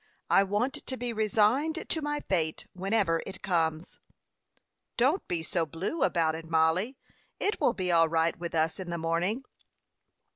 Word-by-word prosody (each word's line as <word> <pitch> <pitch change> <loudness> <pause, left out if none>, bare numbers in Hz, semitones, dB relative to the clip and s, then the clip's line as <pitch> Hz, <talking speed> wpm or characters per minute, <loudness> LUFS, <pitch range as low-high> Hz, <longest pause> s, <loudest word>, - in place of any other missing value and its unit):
I - - +7
want 205 +7 0
to 260 - -3
be 245 -1 -3
resigned 225 +9 +1
to 320 - -1
my 295 0 -2
fate 160 -5 -1
whenever 190 -3 +1
it 190 - -9
comes." 165 -3 -1 1.0
"Don't 275 +11 +2
be 170 -2 -2
so 170 +1 0
blue 180 - -4
about 165 -11 +2
it, 160 0 -7
Mollie. 165 +10 +2 0.4
It 415 - -1
will 235 - +3
be 180 -2 -1
all 165 -1 +5
right 165 0 +2
with 170 -1 -5
us 160 +2 +1
in 185 -2 -6
the 170 - -2
morning." 170 +9 -1
185 Hz, 160 wpm, -29 LUFS, 165-235 Hz, 1.0 s, I